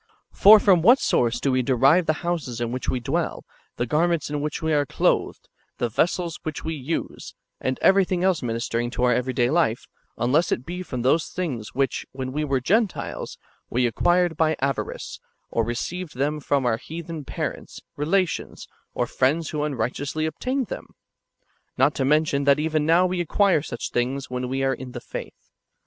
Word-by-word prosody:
For 215 +2 +8
from 190 -5 +4
what 240 +10 +7
source 120 - +1
do 140 - 0
we 130 0 +2
derive 135 +7 +3
the 155 - +3
houses 160 -9 -2
in 120 -1 -2
which 130 +1 -3
we 130 - 0
dwell, 120 - -2 0.3
the 120 - -1
garments 160 +3 +1
in 150 - -1
wdiich 150 0 -3
we 160 -1 0
are 145 -1 +3
clothed, 140 - 0 0.3
the 120 - -1
vessels 170 - 0
which 155 - -5
w^e 160 -4 -4
use, 160 +5 -4 0.2
and 130 0 -1
everything 185 -2 +3
else 185 -3 +2
ministering 115 0 -2
to 125 - -1
our 125 0 +4
every 125 +2 -1
day 120 0 +2
life, 155 -9 +1 0.3
unless 140 +8 +2
it 125 - -1
be 180 +1 -5
from 130 -9 -5
those 155 +6 +2
things 130 - -4
which, 135 0 0
when 130 -1 -4
we 150 +3 -2
were 135 -3 0
Gentiles, 205 - -1 0.3
we 125 +1 +1
acquired 175 +7 +2
by 155 0 +2
avarice, 135 0 -3 0.3
or 115 - +1
received 155 +9 -4
them 145 +3 0
from 140 -2 0
our 115 -2 +2
heathen 165 +2 -7
parents, - - -5 0.2
relations, 175 +5 -1 0.3
or - - +1
friends 150 +5 0
wdio 150 -1 -1
unrighteously 145 +4 -2
obtained 255 - -2
them? - - -7 0.5
— - - -45
not 150 - +4
to 135 - -1
men 150 +3 +4
tion 140 -2 -1
that 140 0 +5
even 155 -1 0
now 175 +3 +5
w^e 180 -1 -1
acquire 180 -1 +2
such 120 -5 -5
things 130 +2 -2
when 125 0 -3
we 135 +1 -1
are 135 0 +2
in 125 -1 -8
the 120 - -5
faith. - - -9
145 Hz, 190 wpm, -24 LUFS, 125-170 Hz, 0.5 s, For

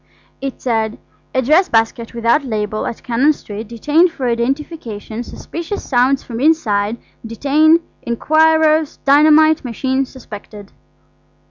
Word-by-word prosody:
It 270 -1 -5
said: 225 -3 -1 0.4
"A 260 - +2
dress 320 +9 +3
basket 230 +1 0
without 235 +5 +2
label 215 -4 -3
at 230 - -7
Cannon 260 +5 +2
Street 215 -5 -8
detained 295 - +2
for 275 -6 -4
identification 235 -3 -3
suspicious 335 - -7
sounds 260 +1 +2
from 230 -2 -7
inside 230 -8 +1 0.3
detain 290 +8 +3 0.2
inquirers 315 +4 +2
dynamite 310 +2 +5
machine 260 +2 -2
suspected." 210 -5 -11
260 Hz, 115 wpm, -17 LUFS, 230-310 Hz, 0.4 s, dynamite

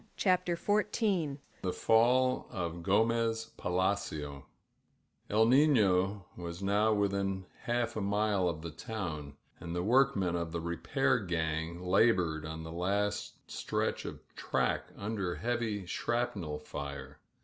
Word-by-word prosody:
CHAPTER 180 -2 +2
XIV 205 - +1 0.2
THE 95 - -1
FALL 125 +5 +3
OF 85 -5 -4
GOMEZ 115 +3 +1
PALACIO 90 -6 -1 0.8
EL 110 +2 +4
NINO*' 105 -8 +4
was 85 +1 -6
now 105 +2 +3
within 100 -2 0 0.2
half 120 0 0
a 110 - -2
mile 100 -2 +1
of 80 -1 -5
the 85 - -5
town, 80 - -5 0.2
and 85 0 -5
the 90 - 0
workmen 110 -6 +3
of 85 -1 -3
the 85 - -1
repair 85 0 +1
gang 80 -1 -2
la 100 +6 +5
bored 80 -5 -1
on 80 0 -6
the 80 - -7
last 100 +4 -1
stretch - - -2
of - - -6
track - - 0
under 100 -4 -2
heavy 115 -4 -2
shrapnel 100 -6 -2
fire. 70 -1 -7
100 Hz, 125 wpm, -32 LUFS, 85-115 Hz, 0.8 s, la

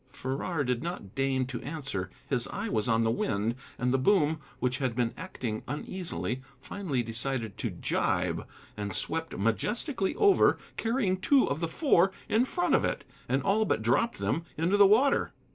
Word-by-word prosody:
Farrar 140 +4 -2
did 125 -2 -1
not 165 - -5
deign 135 -1 +1
to 125 -2 -5
answer: 135 - -4 0.2
his - - +1
eye - - -4
was 110 +2 0
on 115 0 +3
the 115 - +2
wind. 110 -1 0 0.2
And 125 0 0
the 135 - +3
boom, 155 -1 +3 0.2
which 125 0 -1
had 130 -4 -1
been 120 -1 0
acting 120 -11 -4
uneasily, 130 - -4 0.2
finally 155 -12 -2
decided 115 -1 -3
to - - -1
gybe, - - 0 0.3
and 100 -2 -4
swept 160 - -3
majestically 195 - 0
over, 410 -2 +5 0.2
carrying 225 -5 +1
two 270 +7 +4
of 140 - -1
the 165 - 0
Four 190 - +3 0.2
in 230 +3 +3
front 350 +6 0
of - - +4
it, - - -1 0.3
and 135 +2 +1
all 205 +3 +3
but 155 - 0
dropped 125 - +2
them 165 - -1
into 170 +5 +2
the 205 -1 +7
water. 250 +8 +3
140 Hz, 175 wpm, -29 LUFS, 120-190 Hz, 0.3 s, the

